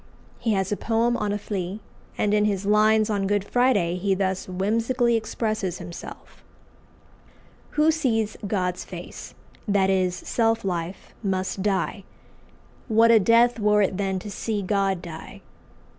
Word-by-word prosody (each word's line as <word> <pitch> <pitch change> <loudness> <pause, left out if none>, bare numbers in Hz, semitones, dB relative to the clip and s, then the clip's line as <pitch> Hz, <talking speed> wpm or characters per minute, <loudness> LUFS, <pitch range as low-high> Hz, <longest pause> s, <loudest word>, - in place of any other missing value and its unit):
He 225 - 0
has 195 -1 0
a 205 - 0
poem 230 +1 +1
on 210 -3 -1
a 205 - 0
flea; 200 -1 -4 0.4
and 210 0 +1
in 210 0 +3
his 200 -2 -1
lines 215 +1 +4
on 200 -2 -1
Good 205 -1 +1
Friday 205 -7 +2
he 195 +1 +1
thus 190 -1 -1
whimsically 230 +6 +1
expresses 215 -4 -2
himself: 170 - -10 1.3
"Who 305 +1 +5
sees 225 -9 0
God's 180 -3 -1
face - - -9 0.3
that 195 -2 +3
is, 185 -2 +1
self 225 0 0
life 175 0 -4
must 190 -2 -2
die: 195 0 -1 0.8
What 230 0 +5
a 225 - +7
death 235 +3 +4
were 210 0 +4
it 190 -1 -1
then 195 -1 -1
to 205 +3 -7
see 205 +1 -3
God 195 -2 0
die! 165 -2 -9
205 Hz, 145 wpm, -24 LUFS, 190-225 Hz, 1.3 s, a